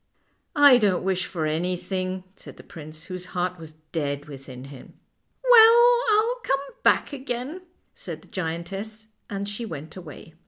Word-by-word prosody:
" - - -48
I 250 -2 +7
don't 200 -6 +2
wish 190 -1 0
for 165 -4 -3
anything," 180 +3 -2
said - - -13
the - - -13
prince, 155 0 -11
whose 185 0 -7
heart 180 0 -1
was 160 -1 -11 0.2
dead 145 -3 -2
within 135 -3 -10
him. 135 -2 -12 0.3
" - - -48
Well, 475 +1 +8 0.2
I'll 455 +4 +2
come 270 0 +1 0.2
back - - +3
again," 265 +5 -5 0.3
said - - -8
the - - -19
giantess, 195 +6 -5 0.2
and 200 0 -4
she 205 +3 -5
went 160 -6 -7
away. 165 -2 -11
185 Hz, 160 wpm, -25 LUFS, 160-225 Hz, 0.3 s, Well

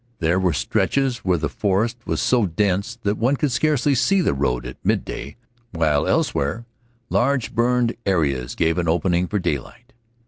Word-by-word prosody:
There 85 +3 +1
were 95 -2 +2
stretches 130 - 0
where 95 -5 +1
the 80 -1 -1
forest 105 - 0
was - - -1
so 120 -5 +2
dense 100 +5 0
that 105 +1 -1
one 130 +5 +2
could 145 -1 -1
scarcely 145 0 +2
see 190 +9 +2
to - - +1
read 65 -3 -1
at - - -9
midday, 70 - -2 0.4
while 75 -4 +1
elsewhere 70 +12 0 0.5
large 130 -1 +1
burned 120 0 +1
areas 70 -10 0
gave 80 +1 +1
an 85 - -1
opening 85 +2 +1
for 105 - -1
daylight. 105 - -4
100 Hz, 165 wpm, -22 LUFS, 80-120 Hz, 0.5 s, were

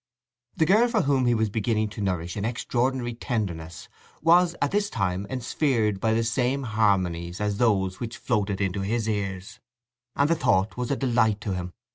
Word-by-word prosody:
The 160 - +2
girl 215 +8 +5
for 225 -5 +1
whom 135 -3 +2
he 120 - +3
was 110 -2 0
beginning 110 0 0
to 105 0 -7
nourish 90 -3 -2
an 100 - -3
extraordinary 120 +2 -1
tenderness 90 - -4 0.4
was 170 +1 +5
at 145 - 0
this 205 0 +1
time 95 0 -2
ensphered 120 -4 0
by 110 +2 +1
the 115 - +1
same 125 +4 0
harmonies 95 -6 0
as 105 -1 -1
those 95 -6 +1
which 120 -1 -5
floated 105 -5 -1
into 95 0 -1
his 110 +3 -1
ears; 100 0 -3 0.6
and 140 - +3
the 165 - +3
thought 100 - +1
was 125 -1 -3
a 140 - +1
delight 115 -5 +1
to 105 -2 -2
him. 90 -1 -5
110 Hz, 180 wpm, -25 LUFS, 100-125 Hz, 0.6 s, girl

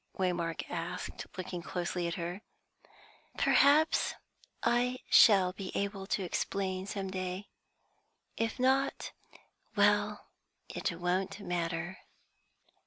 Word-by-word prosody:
Waymark 175 -3 -1
asked, 170 0 -5
looking 185 -1 -4
closely 175 0 -2
at 170 - -2
her. 175 +3 -4 1.0
"Perhaps 300 +3 +4 0.5
I 245 +2 +2
shall 190 -4 +7
be 195 -1 -6
able 200 -1 -2
to 195 - 0
explain 190 +1 -2
some 195 -2 -4
day. 185 +1 -4 0.9
If 225 +1 -1
not, 265 +2 +1 0.6
well, - - +2 0.4
it - - -2
won't 185 +3 -1
matter." 175 -1 -2
185 Hz, 100 wpm, -32 LUFS, 175-200 Hz, 1.0 s, shall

